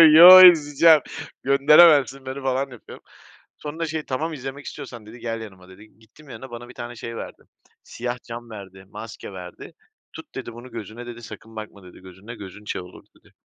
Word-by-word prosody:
"Yo, 180 +3 +11
izleyeceğim. 155 0 +4 0.4
Gönderemezsin 140 -1 +4
beni." 135 +1 -6
falan 135 +1 -2
yapıyorum. 125 -3 -14 0.5
Sonra 160 +3 -6
şey 155 0 -4
"Tamam 155 +5 -4
izlemek 135 0 -8
istiyorsan." 125 -6 -10
dedi 115 +3 -13
"Gel 115 -1 -5
yanıma." 95 -4 -12
dedi. 105 +4 -18
Gittim 115 +7 -21
yanına, 125 +2 -10
bana 120 +1 -10
bir 125 - -14
tane 120 0 -8
şey 115 +1 -8
verdi. - - -9 0.4
Siyah 120 +1 -6
cam 120 0 -9
verdi, 95 -3 -12
maske 105 -1 -10
verdi. 90 -2 -11 0.4
"Tut." - - -13
dedi 120 - -7
"Bunu 120 +2 -12
gözüne." 115 +1 -9
dedi. 120 0 -10
"Sakın 115 0 -12
bakma." 110 -2 -10
dedi 90 - -15
"Gözünle, 95 +5 -12
gözün 100 -1 -12
şey 105 - -5
olur." 90 0 -15
dedi. - - -26
120 Hz, 180 wpm, -22 LUFS, 110-140 Hz, 0.5 s, Yo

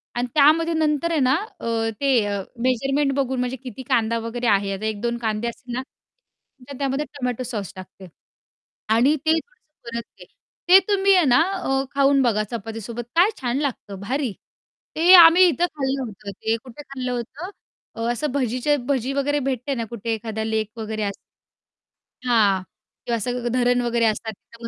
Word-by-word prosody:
अन् 245 - 0
त्यामध्ये 315 +3 +4
नंतर 315 +1 0
आहे 325 - +1
ना, 260 -1 +3 0.3
अ, 225 -1 -1
ते 275 -1 +3
अ, 200 -1 -2 0.2
मेजरमेंट 275 +3 +1
बघून 265 -2 -1
म्हणजे 250 +1 -1
किती 255 +1 -8
कांदा 230 -2 +2
वगैरे 235 +1 -3
आहे, 200 -1 +2
आता 205 +3 -5
1-2 230 +3 -2
कांदे 220 0 -2
असतील 245 +1 -7
ना, 255 - -1 0.9
तर 280 - -7
त्यामध्ये 275 +2 -1
टोमॅटो 255 -4 -4
सॉस 215 -7 -5
टाकते 185 0 -11 0.9
आणि 265 +6 +4
ते 315 - +4
थोडसं 320 - -17
परतते. 235 - -10 0.4
ते 380 +1 +10
तुम्ही 395 0 +4
आहे 360 -4 +4
ना, 255 +4 +5
अ, 270 -8 -1
खाऊन 275 0 +4
बघा 220 -4 +2
चपातीसोबत 225 +1 -5
काय 355 +5 +5
छान 245 +1 -1
लागतं, 225 -8 -4
भारी! 260 +3 -2 0.6
ते 345 +4 +6
आम्ही 345 +1 +9
इथं 340 +2 +1
खाल्लं 270 -1 -1
होतं 205 -2 -8
ते 220 +3 -2
कुठे 255 +2 -11
खाल्लं 265 -3 -5
होतं? 250 +9 -5 0.5
अ, 230 - -6
असं 285 +4 -2
भजीच्या 255 +2 0
भजी 270 -1 0
वगैरे 290 +1 0
भेटते 260 +2 -2
ना 230 -1 -3
कुठे 230 -1 -3
एखादा 220 0 -4
लेक 220 -1 -1
वगैरे 215 -1 -3
असं 200 -1 -2 1.1
हां, 220 -6 +3 0.4
किंवा 235 -1 0
असं 245 +2 -3
ग - - +1
धरण 245 0 +2
वगैरे 235 -1 +1
असतात 220 0 -1 0.2
तर 230 0 -8
245 Hz, 170 wpm, -22 LUFS, 225-280 Hz, 1.1 s, ते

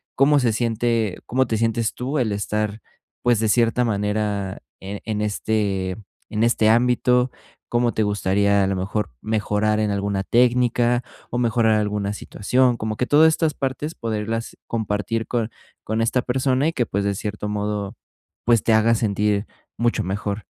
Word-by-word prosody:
cómo 145 +2 +4
se 120 -4 +1
siente, 115 -3 0
cómo 130 +2 +1
te 110 - 0
sientes 115 0 0
tú 135 +5 -3
el 115 -4 0
estar, 105 +1 -2 0.4
pues 120 -3 +3
de 110 - +1
cierta 120 +2 +3
manera, 105 -2 -1 0.2
e 100 +1 -6
en 105 -2 -2
este 100 -3 -1 0.3
en 110 +1 0
este 115 -2 +3
ámbito, 125 +2 +3 0.4
cómo 120 0 +1
te - - 0
gustaría 100 0 +2
a - - +1
lo 95 - 0
mejor 100 - -2
mejorar 105 0 0
en 105 -1 +1
alguna 100 -1 -1
técnica 120 0 +2 0.3
o 120 - -3
mejorar 115 -2 +2
alguna 105 -1 -1
situación, 125 +4 +1
como 110 -1 -3
que 125 - 0
todas 150 +4 +6
estas 160 -1 +1
partes, 140 +4 -3
poderlas 115 0 -3
compartir 110 0 -2
con 120 -2 -1 0.4
con 110 +1 -1
esta 120 +2 +1
persona, 130 +2 +1
y 165 - 0
que, 120 - 0
pues 100 +1 -1
de 100 - +1
cierto 105 0 -4
modo, 105 0 -3 0.5
pues 115 -2 +4
te 115 - +3
haga 110 +1 +4
sentir 105 -1 0 0.3
mucho 120 0 +1
mejor. 100 +2 -3
110 Hz, 165 wpm, -22 LUFS, 105-120 Hz, 0.5 s, todas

